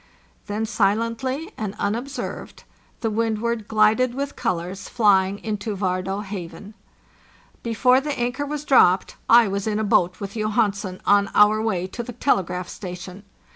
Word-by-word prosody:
Then, 210 +2 -2
silently 230 +7 -1
and 210 -2 -4
unobserved, 245 +7 -4 0.4
the 225 - -1
Wixdward 225 0 -1
glided 220 +3 +3
with 280 +1 -4
colors 185 -3 -3
flying 200 -4 +3
into 210 -1 -3
Vardé 190 +1 -2
Haven. 195 0 -8 0.9
Before 250 +3 +3
the 290 0 -3
anchor 245 +4 -2
was 295 0 -4
dropped, 190 -10 +4
I 235 -1 +7
was 200 +1 -3
in 210 -1 0
a 220 - 0
boat 180 -3 +2
with 200 0 -6
Johansen 210 -3 -1
on 200 0 +4
our 210 +1 +5
way 190 -5 -1
to 190 +6 -6
the 240 +1 -7
telegraph 180 -7 0
station. 185 +2 -8
215 Hz, 140 wpm, -23 LUFS, 195-235 Hz, 0.9 s, I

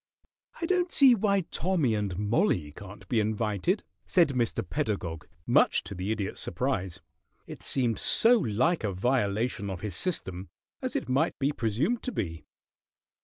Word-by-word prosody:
"I 335 - -1
don't 360 0 +1
see 270 -3 +7
why 200 -3 +2
Tommy 170 -7 0
and 100 -4 -2
Mollie 105 - +1
can't 100 +6 -11
be 120 - +1
invited," 110 - 0 0.2
said 170 -4 +4
Mr. 125 -4 -1
Pedagog, 95 - -3 0.2
much - - +4
to - - -7
the 95 +3 -3
Idiot's 105 -3 -3
surprise, 90 -2 -2 0.4
it - - -10
seemed 120 -5 0
so 235 +1 +4
like 130 - +1
a 100 -3 -1
violation 105 0 0
of 95 -3 -5
his 105 -5 -4
system, 95 - -3 0.3
as - - -3
it - - -1
might 140 +6 +1
be 140 +1 +1
presumed 140 - -1
to 255 - -4
be. 80 - -4
115 Hz, 155 wpm, -28 LUFS, -, 0.4 s, see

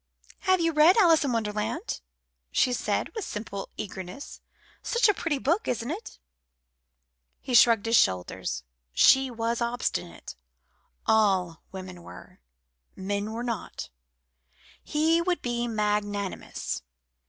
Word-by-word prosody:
have 375 -1 +2
you 330 -1 +2
read 310 +7 +6
Alice 335 -7 +6
in 275 - 0
Wonderland?" 220 - -2 0.5
she 255 -1 +2
said, - - -1
with 440 -3 -4
simple 210 - -6
eagerness. 190 +4 -7 0.4
"Such 470 -1 +2
a 415 - +4
pretty 330 -6 -1
book, 330 +10 0
isn't 240 +2 -2
it?" 400 +8 -7 1.2
He 255 - -5
shrugged 230 -2 +6
his 230 0 +4
shoulders. 90 -8 0 0.3
She 265 - +5
was 230 0 -2
obstinate; 235 - -3 0.7
all 190 -6 +2
women 185 -2 -8
were. 90 - -13 0.6
Men 200 +2 -3
were 230 +2 -4
not. 235 - -5 0.9
He 320 +2 +2
would 355 0 -1
be 240 -1 -1
magnanimous. 210 -2 -2
230 Hz, 120 wpm, -27 LUFS, 205-300 Hz, 1.2 s, read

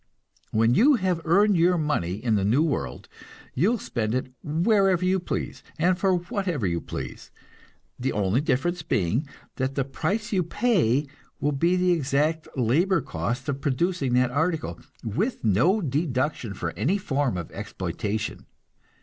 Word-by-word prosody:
When 115 +2 +3
you 270 - +6
have 185 -6 0
earned 200 +5 +4
your 175 +2 +4
money 150 - 0
in 110 +2 -1
the 100 -2 +2
new 120 +10 +3
world, 70 - -3 0.5
you 170 +11 +3
will 240 - +1
spend 115 - -2
it 130 0 -3
wherever 185 +3 +2
you 190 +1 +2
please, 175 - -4 0.2
and 180 +3 +3
for 190 0 +2
whatever 175 - -2
you 85 -2 0
please; - - -7 0.7
the 130 +2 0
only 105 +5 +1
difference 165 +5 0
being 115 - 0 0.3
that 130 +1 -1
the 135 - 0
price 195 - -2
you 190 - +3
pay 170 - +2 0.3
will 145 - +1
be 170 +6 +2
the 180 0 +2
exact 155 0 +1
labor 155 - +2
cost 130 0 -3
of 140 -1 -2
producing 140 -1 0
that 125 0 +3
article, 160 +4 -1 0.2
with 195 - -2
no 130 - +3
deduction 135 - -1
for 85 -2 -3
any 180 - 0
form 140 - -1
of 85 - -6
exploitation. 105 +1 -4
150 Hz, 155 wpm, -25 LUFS, 125-180 Hz, 0.7 s, you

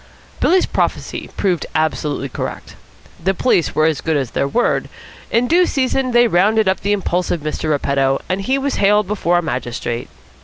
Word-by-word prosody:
Billy's 370 +1 +3
prophecy - - -2
proved 180 -4 0
absolutely 155 -3 -1
correct. 130 - -6 0.5
The 190 +2 +1
police 180 -5 +1
were 155 - +3
as 155 -3 +1
good 160 -2 0
as 130 -4 -2
their 140 - 0
word. 240 +12 0 0.4
In 235 +2 +2
due 350 +4 +4
season 265 -1 0
they 240 0 +4
rounded 210 +3 +3
up 190 - +2
the 200 - -1
impulsive 180 -4 -1
Mr. 155 +1 -3
Repetto, 140 -2 +1
and 185 +2 -1
he 260 +7 0
was 275 0 -2
haled 210 +1 +3
before 180 -3 0
a 175 - 0
magistrate. 120 -4 -4
180 Hz, 170 wpm, -18 LUFS, 155-225 Hz, 0.5 s, due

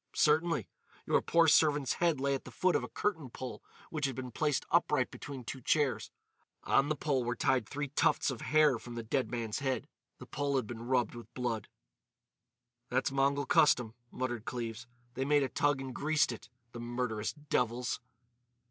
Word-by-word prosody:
"Certainly. 160 +2 +3 0.4
Your - - +3
poor 170 -1 +4
servant's 150 -3 +4
head 165 -5 +3
lay 140 +1 +1
at 135 - -3
the - - -10
foot 185 -1 +1
of - - +1
a - - -5
curtain 165 -10 -2
pole 125 +1 -7 0.3
which 150 -3 0
had 135 - -4
been 130 -1 -5
placed 150 +3 0
upright - - +2
between 135 -3 -7
two 130 +3 -6
chairs. 145 +1 +1 0.5
On 135 +2 +3
the 155 - +1
pole 140 -3 0
were 120 +1 -1
tied 125 -5 +1
three 145 0 -3
tufts 140 - +2
of 125 - -6
hair 150 -5 +4
from 120 +1 -9
the 115 - -4
dead 125 +4 0
man's 115 -2 -3
head. 130 -4 -1 0.3
The - - -10
pole 140 -1 -2
had 130 -4 +1
been 115 +1 -7
rubbed 125 -3 +1
with 120 -1 -10
blood." 120 -4 -2 1.2
"That's 130 +2 +1
Mongol 140 +1 +2
custom," 125 -6 +4 0.2
muttered 120 -4 -3
Cleves. 120 -1 -5 0.3
"They 130 - -2
made 145 +1 +3
a 135 - -1
toug 145 -2 +1
and 135 -1 -5
'greased' 150 -1 +2
it!—the 120 0 -11
murderous 120 -2 -2
devils!" 125 -5 -1
130 Hz, 180 wpm, -32 LUFS, 120-145 Hz, 1.2 s, poor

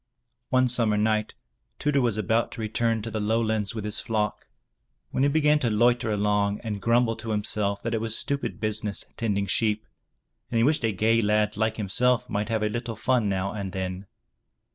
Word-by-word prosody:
One 130 0 +3
summer 115 -4 +2
night 110 0 0 0.4
Tudur 145 -2 +1
was 115 -4 +1
about 110 +3 +1
to - - -6
return 110 0 0
to 115 - -5
the 110 - -2
lowlands 110 -1 0
with 110 -2 -4
his 105 0 -1
flock, 105 -3 -2 0.6
when - - -1
he 140 - +4
began 150 0 +3
to 120 - 0
loiter 120 +2 +2
along 105 -1 +1
and 105 -3 -4
grumble 115 0 +2
to 110 0 -5
him 105 -1 0
self 100 -1 -1
that 115 - -2
it 110 - 0
was 115 0 0
stupid 140 0 -2
business 110 -1 -2
tending 100 -3 0
sheep, 105 +1 +1 0.6
and 115 - -1
he 115 - +4
wished 150 +1 +2
a 115 - +2
gay 110 +3 +2
lad 105 0 +1
like 110 +1 0
himself 115 +4 +1
might 105 +2 -1
have 110 -1 0
a - - +2
little 115 +1 -4
fun 110 -1 +1
now 95 0 -1
and 100 -3 -5
then. 95 0 -4
110 Hz, 195 wpm, -26 LUFS, 105-115 Hz, 0.6 s, he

